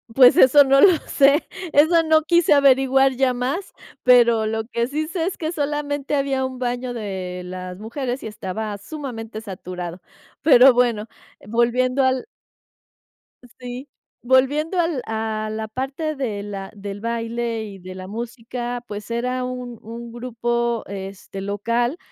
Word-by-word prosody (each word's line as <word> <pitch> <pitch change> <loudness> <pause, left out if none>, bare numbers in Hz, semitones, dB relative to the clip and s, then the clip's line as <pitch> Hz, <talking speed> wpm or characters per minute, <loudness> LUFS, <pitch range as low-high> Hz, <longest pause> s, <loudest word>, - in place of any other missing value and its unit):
Pues, 255 -2 +7
eso 285 +3 +8
no 275 0 +4
lo 365 +3 +7
sé, 280 +2 +4 0.3
eso 320 +4 +5
no 315 -1 +4
quise 340 0 +4
averiguar 270 -1 +4
ya 260 -1 +2
más, 265 +11 -3 0.3
pero 235 -3 +5
lo 220 +1 -1
que 235 0 -2
sí 305 +3 -2
sé 335 0 -2
es 375 - -3
que 315 -1 -3
solamente 290 -2 -2
había 275 -2 0
un 260 -1 -6
baño 245 0 -2
de 190 -5 -5
las 180 0 -7
mujeres 245 +4 -4
y - - -4
estaba 210 0 -5
sumamente 225 -2 -7
saturado. 180 -3 -7 0.4
Pero 265 -3 +7
bueno, 235 -3 +1 0.4
volviendo 245 +4 +1
al 260 - +1 1.3
Sí. 250 +2 -7 0.4
Volviendo 285 +8 +2
al 330 -6 0
a 220 -1 -3
la 220 0 -4
parte 270 +7 -3
de 230 -7 -3
la 195 -2 -6
del 200 0 -7
baile 230 0 -2
y 200 -2 -9
de 185 +1 -9
la 185 0 -8
música, 240 +2 -5
pues, 210 +1 -7
era 250 +2 -1
un 250 -2 -6
un 235 +1 -8
grupo, 235 -1 -2
este, 195 0 -7
local 230 - -1
245 Hz, 145 wpm, -22 LUFS, 220-270 Hz, 1.3 s, eso